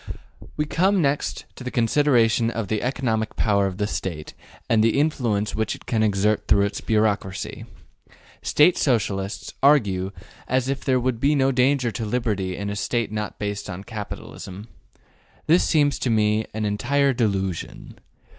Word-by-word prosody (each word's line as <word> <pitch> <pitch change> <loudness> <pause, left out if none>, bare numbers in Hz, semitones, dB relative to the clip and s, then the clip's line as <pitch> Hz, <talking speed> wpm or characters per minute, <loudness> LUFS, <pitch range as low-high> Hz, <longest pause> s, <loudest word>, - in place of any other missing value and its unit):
We 150 - +1
come 190 +6 +2
next 140 -3 -1
to - - -9
the 125 - -3
consideration 120 -2 +3
of 115 -4 -4
the 110 -1 0
economic 115 -4 -1
power 100 -2 +2
of 95 -1 -5
the 105 - 0
State 85 -7 -5 0.3
and 110 -1 +3
the 115 +3 +2
influence 120 -9 0
which 110 -1 -1
it - - -16
can 115 -2 0
exert 105 0 +1
through 100 -1 +4
its 100 - -4
bureaucracy. 105 -4 -1 0.8
State 160 +4 +4
Socialists 100 -6 -1
argue 100 -10 +3 0.4
as 130 0 +1
if 135 0 -2
there 130 -2 +2
would 125 -2 -1
be 145 +4 +3
no 135 -1 +3
danger 130 -1 +2
to 115 - -4
liberty 105 -5 -1
in 100 0 -3
a - - -4
State 115 +3 -1
not 105 -1 -4
based 105 0 -4
upon 90 +1 -6
capitalism. 105 -1 -8 0.8
This 170 +3 +4
seems 145 -3 +2
to 125 - -1
me 110 -1 +2
an 110 0 -3
entire 135 +7 +1
delusion. 95 -7 -3
110 Hz, 160 wpm, -23 LUFS, 100-130 Hz, 0.8 s, through